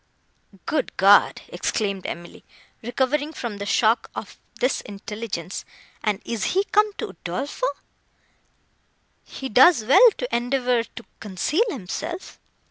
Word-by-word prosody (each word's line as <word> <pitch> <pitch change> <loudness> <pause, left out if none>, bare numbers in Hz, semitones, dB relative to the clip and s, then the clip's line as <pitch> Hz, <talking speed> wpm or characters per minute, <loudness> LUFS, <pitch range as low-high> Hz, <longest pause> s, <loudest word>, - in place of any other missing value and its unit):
"Good 310 -3 -2
God!" 200 +1 +5
exclaimed 200 -4 -2
Emily, 170 0 -8 0.4
recovering 270 +6 -1
from 235 -8 -5
the 200 0 -5
shock 225 +3 +2
of - - -7 0.2
this 255 - +1
intelligence; 205 -3 -6 0.4
"and 210 -2 -1
is 230 - -2
he 390 - +4
come 420 +1 +2
to - - -5
Udolpho! 185 - -3 1.6
He 270 - -7
does 260 +2 +6
well 375 - +8
to - - -2
endeavour 245 -1 +1
to 230 - -12
conceal 225 - 0
himself." 320 - -6
235 Hz, 120 wpm, -23 LUFS, 205-295 Hz, 1.6 s, well